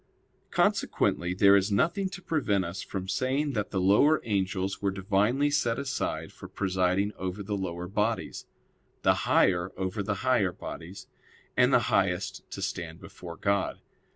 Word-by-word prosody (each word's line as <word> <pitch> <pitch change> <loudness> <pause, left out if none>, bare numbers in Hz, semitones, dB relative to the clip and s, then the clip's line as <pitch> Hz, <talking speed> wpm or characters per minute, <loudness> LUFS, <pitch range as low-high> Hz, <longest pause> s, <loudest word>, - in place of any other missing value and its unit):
Consequently 90 +1 +1
there 100 +1 +6
is 100 +1 +2
nothing 170 - +1
to 190 0 -9
prevent 105 - 0
us 85 +3 -5
from 95 -1 -5
saying 130 +8 0
that 105 -3 -2
the 95 - -1
lower 105 +12 +4
angels 95 -2 -1
were 100 - +1
divinely 105 +9 +1
set 120 -5 +1
aside 135 -1 -3
for - - -10
presiding 95 +1 0
over 95 +2 -4
the 105 +1 -3
lower 90 -2 -4
bodies, 105 +4 -2 0.6
the - - +5 0.2
higher 90 0 +3
over 95 +2 -2
the 100 +1 -1
higher 120 -8 +3
bodies; 90 +3 -8 0.5
and - - +4
the - - +5
highest - - +1
to 100 - -6
stand 90 -4 -4
before 85 -1 -10
God. 100 -1 0
100 Hz, 155 wpm, -28 LUFS, 95-115 Hz, 0.6 s, there